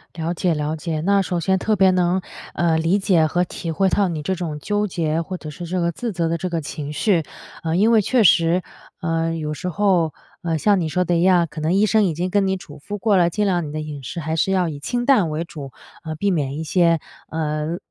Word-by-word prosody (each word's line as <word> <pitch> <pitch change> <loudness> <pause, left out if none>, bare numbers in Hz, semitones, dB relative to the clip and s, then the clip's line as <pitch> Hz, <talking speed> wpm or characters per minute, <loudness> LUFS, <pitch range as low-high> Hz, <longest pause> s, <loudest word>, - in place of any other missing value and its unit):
了 165 +1 -2
解， 175 0 0
了 150 +1 -2
解。 155 0 -3
那 200 +3 +3
首 180 -2 -2
先 190 +3 +1
特 215 +2 +1
别 190 -1 +5
能， 180 0 +1 0.3
呃， 165 -2 +2
理 165 +5 +2
解 185 -5 +3
和 175 +3 +1
体 165 -1 -5
会 190 +3 +2
到 200 0 +2
你 155 -4 -4
这 190 - 0
种 165 -5 -4
纠 205 +4 -1
结， 165 -2 -1
或 185 +2 -5
者 155 - -8
是 175 +3 -7
这 180 +2 -2
个 170 0 +1
自 230 +8 -4
责 170 -4 -1
的 170 +1 0
这 185 +2 -3
个 165 -1 -2
情 145 0 -6
绪。 170 +1 +1 0.4
啊， 160 0 -1
因 215 +6 +4
为 220 -2 +5
确 240 +2 +2
实， 170 0 +4 0.4
呃， 165 -1 0
有 150 -1 -3
时 180 +4 -4
候， 175 -3 +2 0.3
呃， 165 -2 -1
像 200 +4 +3
你 160 - -1
说 180 +4 +1
的 175 0 0
一 - - +1
样， 180 -2 +4
可 155 - -7
能 160 +3 +1
医 205 +2 +4
生 215 0 +3
已 175 -5 +1
经 180 +2 -2
跟 200 -1 +2
你 190 0 0
嘱 145 -5 -12
咐 205 +8 -6
过 205 -1 +2
了， 175 -1 +4
尽 210 +4 -1
量 175 -3 +1
你 - - -7
的 155 0 -3
饮 150 -2 -7
食 150 +7 -5
还 160 0 -2
是 190 +4 +1
要 185 -2 +2
以 145 -3 -5
清 245 - -2
淡 215 - +4
为 155 +2 -2
主， 145 -5 -9 0.3
呃， 160 -1 -5
避 200 +4 0
免 145 -4 -1
一 160 - -3
些， 170 0 +3 0.3
呃， 155 +1 -2
170 Hz, 275 characters per minute, -21 LUFS, 160-190 Hz, 0.4 s, 别